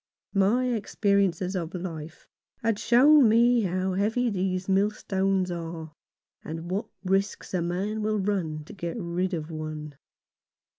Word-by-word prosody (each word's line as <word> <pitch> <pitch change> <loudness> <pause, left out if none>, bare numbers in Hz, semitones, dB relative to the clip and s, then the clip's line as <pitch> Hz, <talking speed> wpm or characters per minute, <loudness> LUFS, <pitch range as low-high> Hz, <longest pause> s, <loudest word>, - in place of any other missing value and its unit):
My 215 +6 +3
experience 200 -4 +1
of 175 -1 -3
life 165 -3 -7 0.4
had 225 -2 +1
shown 270 +1 +6
me 235 +2 +5
how 185 -1 -1
heavy 220 +5 +1
these 185 -1 -1
millstones 195 -1 +1
are, 165 -2 -6 0.5
and 165 +2 -6
what 195 +3 -1 0.2
risks 195 +2 -1
a 180 - +1
man 190 +6 -2
will 215 0 0
run 185 -7 -1
to - - -12
get 170 +1 -5
rid 180 0 -1
of 160 0 -5
one. 155 -1 -6
190 Hz, 135 wpm, -27 LUFS, 170-210 Hz, 0.5 s, shown